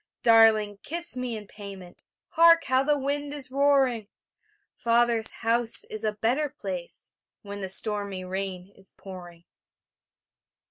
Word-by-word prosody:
Darling, 220 -3 +4
kiss 340 -2 -5
me 250 -3 -4
in 210 - -10
payment... 195 -3 -11 0.3
Hark! 335 0 +5
how 260 +1 +2
the 295 +2 +1
wind 285 +1 -3
is 265 -3 -5
roaring! 270 -5 +2 0.7
Father's 235 -1 +1
house 230 0 +3
is 215 0 -6
a 215 - +1
better 240 +8 -1
place 185 -8 -6 0.3
When 200 0 -8
the 190 - -4
stormy 200 -1 +1
rain 190 0 -5
is 190 0 -7
pouring. 175 -3 -11
225 Hz, 130 wpm, -26 LUFS, 195-260 Hz, 0.7 s, Hark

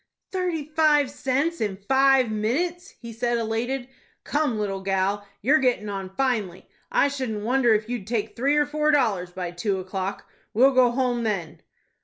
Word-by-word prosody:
"Thirty 360 -5 -2
five 305 -2 +3
cents 280 +5 -1
in 205 -3 -1
five 270 -3 +4
minutes," 335 - -2
he 235 -2 -9
said, 240 +1 0
elated. 235 +3 -2 0.4
"Come, 290 -6 0
little 195 -2 -2
gal, 195 +1 -1 0.2
you're 290 +7 +4
gettin' 245 -5 0
on 195 -2 -4
finely. 220 -9 -1 0.2
I - - +4
shouldn't 255 -7 -3
wonder 240 -1 +3
if 215 +1 -2
you'd 235 -5 -4
take 220 -2 -2
three 275 +5 +1
or 295 - +4
four 300 +1 0
dollars 220 -12 +2
by 180 -1 -5
two 190 +3 -1
o'clock. 190 +1 -4 0.3
We'll 260 +5 +6
go 255 -2 +5
home 245 -1 0
then." 195 -8 -3
240 Hz, 165 wpm, -24 LUFS, 205-275 Hz, 0.4 s, We'll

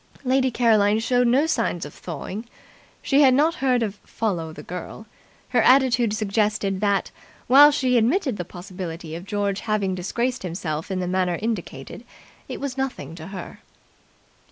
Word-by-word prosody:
Lady 260 0 +2
Caroline 220 -4 +3
showed 245 +2 +2
no 265 +6 +3
signs 175 - -1
of 145 - -10
thawing. 185 +7 -7 0.6
She 280 +1 +3
had 260 -3 +6
not 310 +4 +3
heard 250 -3 +2
of 210 -2 -4
'Follow 175 -8 -3
the - - -10
Girl'. 180 +5 -8 0.4
Her 250 -2 +3
attitude 250 -3 +4
suggested 210 -2 0
that, 200 -2 +1 0.3
while 280 +4 +8
she 260 -4 +2
admitted 265 - +1
the 180 - -3
possibility 175 -3 -8
of 170 +3 -7
George 200 -1 -1
having 210 -4 -1
disgraced 235 +8 -2
himself 165 -3 -4
in 185 -1 -2
the 180 - -2
manner 180 -1 0
indicated, 205 - -5 0.5
it - - -5
was 275 -1 -4
nothing 205 - -4
to 165 -1 -9
her. 190 -3 -8
210 Hz, 155 wpm, -23 LUFS, 180-250 Hz, 0.6 s, while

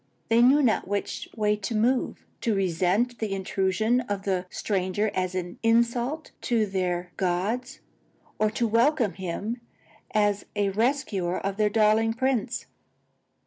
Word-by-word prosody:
They 230 +1 +5
knew 275 +4 +6
not 225 -7 +2
which 200 +1 -3
way 210 -2 +2
to 210 +3 -4
move: 245 +4 0 0.2
to 225 -3 +1
resent 195 +6 +1
the 220 -3 -2
intrusion 195 +5 +1
of 205 -5 -4
the 185 -2 -1
stranger 200 +2 -1
as 185 0 -1
an 175 -1 -4
insult 235 +6 +1
to 230 -3 +1
their 180 -2 -2
gods, 195 +7 -1 0.6
or 215 - +3
to 230 +2 0
welcome 230 0 +2
him 200 +6 -4 0.5
as 205 -1 +1
the 205 -1 +1
rescuer 210 -5 0
of 195 0 -3
their 210 -1 +3
darling 220 +1 +3
prince. 250 -2 -1
210 Hz, 140 wpm, -26 LUFS, 190-235 Hz, 0.6 s, knew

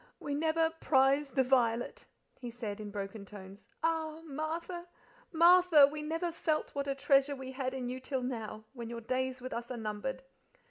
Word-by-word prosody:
"'We 285 - -4
never 320 +2 +2
prize 275 -2 +3
the 265 0 +2
violet,'" 245 - +1 0.3
he 245 - -6
said, 225 -3 -5
in 210 -1 -6
broken 200 +1 -5
tones. 200 0 -12 0.2
"Ah! 320 -1 0
Martha, 330 +4 -4 0.4
Martha! 340 -2 +7
we 300 +2 -4
never 330 +3 -2
felt 320 -2 -1
what 280 0 -2
a 275 - 0
treasure 275 +1 +3
we 260 -1 -7
had 260 0 -3
in 255 -2 -3
you 255 +1 -4
till 260 0 -3
now, 220 -4 -4
when 235 -3 -7
your 235 0 -6
days 255 +2 -2
with 255 - -5
us 235 +1 -5
are 250 - -4
numbered." 225 +5 -4
265 Hz, 180 wpm, -32 LUFS, 235-310 Hz, 0.4 s, Martha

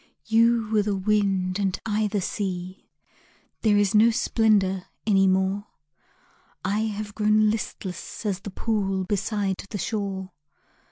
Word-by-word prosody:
You 230 0 +3
were 215 -1 +4
the 205 -1 -1
wind 195 -2 +1
and 195 -2 0
I 215 0 +1
the 205 -1 -1
sea 185 -1 -4 0.7
There 210 -2 +4
is 205 0 +2
no 220 +2 +6
splendor 210 -5 +2 0.2
any 195 -3 +4
more, 190 +2 +1 1.0
I 200 +3 +1
have 210 -1 -4
grown 215 0 +3
listless 205 -2 -5
as 200 -3 -1
the 205 - -7
pool 195 -2 -1
Beside 200 0 -1
the 205 - -4
shore. 195 -1 -3
205 Hz, 130 wpm, -25 LUFS, 190-215 Hz, 1.0 s, no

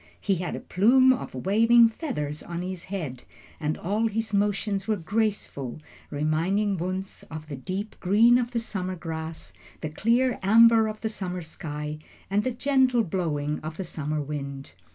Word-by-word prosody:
He 195 -2 +1
had 175 +1 -3
a - - -4
plume 255 +7 +5
of 245 - -6
waving 230 - +5
feathers 155 - -4
on 170 0 -5
his 185 -1 -6
head, 160 -10 -5 0.4
and 150 -1 -1
all 210 +5 0
his 220 0 -2
motions 200 -1 0
were 220 - +2
graceful, 195 - -2 0.3
reminding 170 +8 0
Wunzh 185 +2 -4
of 155 -1 -7
the 150 -2 -6
deep 190 +10 -5
green 225 +6 +5
of 240 -1 -1
the 240 -1 -1
summer 185 -5 -4
grass, 160 - -6 0.3
the 155 - -3
clear 235 +8 +2
amber 225 +2 +6
of 215 0 -6
the 220 - -1
summer 180 -4 -4
sky, 150 -1 -6 0.3
and 205 +1 +2
the 255 - 0
gentle 255 -1 +2
blowing 155 -5 -2
of 155 +1 -7
the 190 - -3
summer 155 -3 -3
wind. 140 -2 -5
190 Hz, 165 wpm, -26 LUFS, 155-220 Hz, 0.4 s, amber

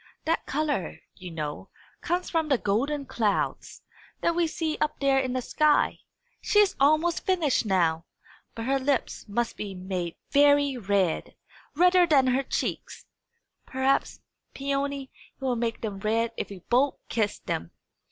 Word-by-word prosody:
"That 330 +1 0
colour, 290 - -2
you 180 - -9
know, 150 -3 -5 0.3
comes 355 +1 -1
from 320 -2 0
the 270 - +4
golden 275 +8 -1
clouds, 215 -5 -2 0.4
that 335 - +2
we 340 0 +1
see 315 -1 -2
up 305 - 0
there 275 -1 +3
in 260 -1 -1
the 255 -1 -2
sky. 305 +3 +2 0.4
She - - 0
is 415 -2 +5
almost 310 +4 +3
finished 320 - +1
now. 170 -4 +1 0.5
But 230 - -5
her 270 +2 +1
lips 270 -3 -1
must 230 +3 -2
be 200 -2 -5
made 180 -2 -4 0.2
very 285 -1 +4
red 200 -7 0 0.4
redder 360 +2 +5
than 280 -5 +4
her 255 +1 +2
cheeks. 275 - -4 0.6
Perhaps, 265 +1 0 0.3
Peony, 275 0 -2 0.3
it - - -11
will 255 -2 +1
make 230 -1 -2
them 205 -3 -4
red 225 +3 0
if - - -4
we 200 - -8
both 265 +4 +3
kiss 215 -3 -1
them!" 85 - -4
265 Hz, 150 wpm, -27 LUFS, 210-295 Hz, 0.6 s, is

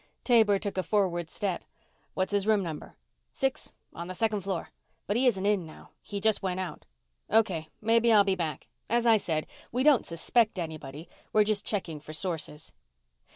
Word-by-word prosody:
Taber 220 -5 +5
took 200 -1 -3
a - - +3
forward 180 -5 0
step. 190 -1 -2 0.5
"What's 185 +1 0
his 205 0 +1
room 215 -3 +3
number?" 160 -4 -7 0.4
"Six 270 -1 -1 0.2
on 170 +1 -6
the 185 - -6
second 215 +1 0
floor. 190 -3 -4 0.3
But 205 - -1
he 255 +2 +3
isn't 195 -5 +1
in 205 -3 +2
now. 160 -1 -13
He 200 - -5
just 220 +1 +2
went 185 -1 -2
out." 180 -5 -6 0.4
"Okay. 185 -8 +2
Maybe 230 +1 +4
I'll 210 -2 +7
be 195 -1 +1
back. 165 -6 -3 0.2
As 235 +1 +2
I 225 -2 +6
said, 160 -6 -2 0.3
we 250 +2 0
don't 290 -4 +5
suspect 215 +6 +1
anybody. 155 -2 -6 0.3
We're 215 - +6
just 210 -1 0
checking 175 -7 -2
for 150 +1 -10
sources." 155 -3 -4
195 Hz, 180 wpm, -29 LUFS, 170-220 Hz, 0.5 s, I'll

